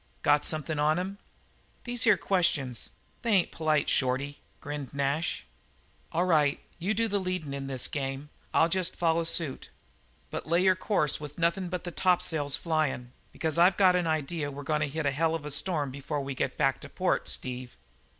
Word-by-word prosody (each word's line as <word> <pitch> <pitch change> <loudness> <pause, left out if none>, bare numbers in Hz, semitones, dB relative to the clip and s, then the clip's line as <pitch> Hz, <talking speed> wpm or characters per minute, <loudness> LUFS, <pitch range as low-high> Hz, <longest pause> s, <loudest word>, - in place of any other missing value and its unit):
"Got 145 0 +4
something 155 0 -1
on 155 +2 +3
him?" 190 +3 -4 0.6
"These 245 -1 -2
here 210 -4 +6
questions, 160 -10 0 0.3
they 230 -3 +1
ain't 185 -4 +3
polite, 155 -2 +1
Shorty," 135 +2 0 0.2
grinned 145 -3 -6
Nash. 140 +4 -1 0.7
"All 175 +3 +1
right. 150 -5 +3 0.2
You 195 +5 0
do 230 +2 +1
the 205 -1 0
leadin' 185 -6 -3
in 140 -1 -4
this 130 -2 0
game 135 -2 -3
and 150 - -15 0.2
I'll 165 - +4
jest 185 +1 0
follow 165 -1 +2
suit. 165 -4 +1 0.6
But - - -5
lay 170 +3 +3
your 190 -1 +5
course 185 -6 +1
with 150 -1 -8
nothin' 170 +2 +1
but 180 -1 -4
the 175 - -5
tops'ls 160 -6 +2
flyin', 155 -7 -1 0.2
because 160 0 -1
I've 180 +3 +5
got 185 -2 +5
an 175 -2 +1
idea 155 -1 -1
we're 145 0 -7
goin' 150 +1 0
to 150 - +1
hit 155 +2 -3
a 140 - +3
hell 160 +4 +1
of 155 -3 -5
a 150 - -5
storm 150 -2 0
before 140 +2 -4
we 135 0 -4
get - - -2
back - - +1
to - - -7
port, - - 0
Steve." 125 0 -4
155 Hz, 190 wpm, -29 LUFS, 140-180 Hz, 0.7 s, here